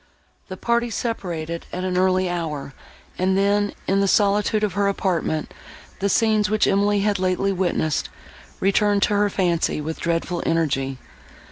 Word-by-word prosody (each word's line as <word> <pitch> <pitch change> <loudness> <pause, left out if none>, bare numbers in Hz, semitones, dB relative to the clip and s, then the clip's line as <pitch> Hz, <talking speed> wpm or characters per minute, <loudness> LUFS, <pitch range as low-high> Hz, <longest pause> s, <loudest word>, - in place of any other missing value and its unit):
The 185 - -7
party 235 +2 0
separated, 170 -8 -4
at 180 - -4
an 185 -1 -1
early 185 0 +2
hour, 155 -6 -4 0.5
and 190 +1 +2
then, 205 +1 +2
in 195 +1 +1
the 200 - +2
solitude 210 +2 +2
of 210 - 0
her 200 0 +1
apartment, 175 -5 -1 0.5
the 200 - 0
scenes, 215 0 +2
which 215 0 +2
Emily 200 +1 +2
had 205 -1 +1
lately 185 +1 +1
witnessed, 175 -5 -1 0.5
returned 200 +1 +2
to - - +2
her 205 0 +2
fancy, 175 -5 0
with 160 +2 -5
dreadful 170 +1 -1
energy. 135 -5 0
190 Hz, 150 wpm, -22 LUFS, 170-205 Hz, 0.5 s, early